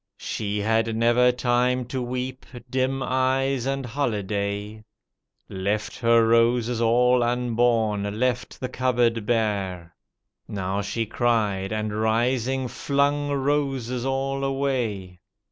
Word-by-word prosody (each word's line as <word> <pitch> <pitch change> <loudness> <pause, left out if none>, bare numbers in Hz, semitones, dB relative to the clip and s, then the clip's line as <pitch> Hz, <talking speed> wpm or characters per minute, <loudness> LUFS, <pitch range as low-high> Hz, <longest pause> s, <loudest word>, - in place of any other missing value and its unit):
She 105 -1 -3
had 110 +1 +1
never 120 +2 +4
time 125 0 +1
to 130 +2 -4
weep, 125 +1 -4 0.2
dim 130 +1 0
eyes 130 0 0
and 135 -1 -2
holiday. 105 -4 -3 0.6
Left 100 +3 -3
her 115 -1 +4
roses 115 0 +2
aU 125 +2 +4
unborn, 115 -4 +1
left 125 -1 -1
the 130 - -3
cupboard 120 -4 0
bare. 95 -7 -1 0.5
Now 95 0 -2
she 115 +3 -2
cried 105 -4 0
and 110 -1 -2
rising 125 +3 +1
flung 145 -1 0
roses 135 -3 -1
all 135 +1 -1
away. 125 -10 -2
120 Hz, 110 wpm, -24 LUFS, 110-130 Hz, 0.6 s, never